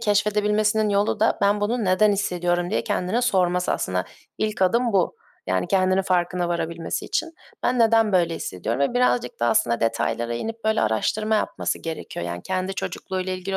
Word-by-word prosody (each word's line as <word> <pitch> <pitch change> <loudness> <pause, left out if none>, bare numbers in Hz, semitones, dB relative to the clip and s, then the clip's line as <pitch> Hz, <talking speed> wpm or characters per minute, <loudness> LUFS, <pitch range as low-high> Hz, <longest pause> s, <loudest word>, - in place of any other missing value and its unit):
keşfedebilmesinin 210 0 +2
yolu 205 +1 +1
da, 220 - +2
"Ben 205 +1 +2
bunu 225 +2 0
neden 195 +3 +4
hissediyorum?" 175 -3 -1
diye - - 0
kendine 205 +3 -1
sorması. 180 -6 +2
Aslında 90 0 -1 0.3
ilk 215 -2 -1
adım 235 +5 +2
bu, 190 -3 +1 0.3
yani, 90 0 0
kendinin 185 0 +2
farkına 180 -1 0
varabilmesi 170 -1 -3
için. 330 0 -2 0.3
Ben 250 0 +1
neden 225 -2 +4
böyle 170 -3 +2
hissediyorum 110 - -4
ve 140 - +1
birazcık 125 - +1
da 120 - +2
aslında 115 0 +2
detaylara 115 +1 -1
inip 225 - -5
böyle 220 0 +2
araştırma 205 - 0
yapması 215 - -1
gerekiyor. 160 - -6
Yani, 85 0 -5
kendi 185 +1 -2
çocukluğuyla 185 -1 -4
ilgili 185 +1 -3
190 Hz, 165 wpm, -23 LUFS, 170-215 Hz, 0.3 s, neden